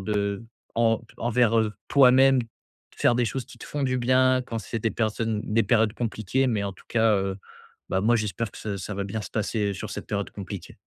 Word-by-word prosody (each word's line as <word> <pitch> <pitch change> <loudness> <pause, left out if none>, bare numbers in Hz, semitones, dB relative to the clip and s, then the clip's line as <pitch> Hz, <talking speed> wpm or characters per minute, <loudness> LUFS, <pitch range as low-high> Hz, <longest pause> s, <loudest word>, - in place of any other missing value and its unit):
de 100 +1 -1 0.3
en 115 -1 +2 0.2
envers, 120 -1 +2
heu, 110 -1 +1 0.2
toi-même, 135 0 +6 0.6
faire 120 - +3
des 120 0 +2
choses 125 +4 -3
qui - - -15
te - - -10
font 145 - -3
du 130 -1 +1
bien 130 +1 +3
quand 115 -2 -5
c'est 115 +2 -4
des 115 +1 0
personnes 110 -1 -1
des 110 +1 +2
périodes 110 -3 +3
compliquées. 120 +2 -1
Mais 110 -5 0
en 100 - -3
tout - - -20
cas, 110 -2 +3
heu, 95 0 -1 0.5
bah 95 - +1
moi 115 +4 +3
j'espère 110 +1 -2
que - - -14
ça 100 -2 -4
ça 100 +3 -5
va 100 0 -2
bien 100 +3 -4
se - - -8
passer 105 -2 -1
sur - - -6
cette - - -6
période 100 -1 -3
compliquée. 100 -2 -8
110 Hz, 215 wpm, -26 LUFS, 100-120 Hz, 0.6 s, toi-même